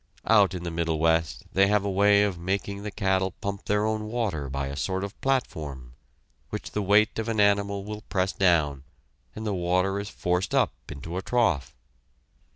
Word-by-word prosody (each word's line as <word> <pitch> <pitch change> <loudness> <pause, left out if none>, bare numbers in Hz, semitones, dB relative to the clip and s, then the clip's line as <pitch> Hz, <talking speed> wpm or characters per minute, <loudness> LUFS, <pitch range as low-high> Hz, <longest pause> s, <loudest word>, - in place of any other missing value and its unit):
Out 100 -4 +4
in 90 - -5
the 85 - -3
Middle 80 -1 -1
West 80 -1 +1
they 95 +1 +5
have 105 0 +2
a 100 - 0
way 100 +1 +5
of 100 -4 -1
making 100 +3 -2
the 105 - -4
cattle 95 -3 0
pump 100 0 -4
their 105 +1 +1
own 110 0 -1
water 105 - -2
by 70 +1 -2
a 70 +1 -5
sort 95 +7 -2
of 100 0 -7
platform, 75 - -2 0.6
which - - -6
the 105 - -1
weight 105 +3 +3
of 110 +1 -2
an 110 -2 -1
animal 100 -1 +2
will 105 +1 -6
press 95 0 +1
down, 80 -7 +2 0.5
and 110 - -6
the 105 - -1
water 90 +2 +1
is 100 0 -5
forced 90 +1 -1
up - - +3 0.2
into 80 +5 -6
a - - -1
trough. 105 - 0
95 Hz, 190 wpm, -26 LUFS, 85-105 Hz, 0.6 s, they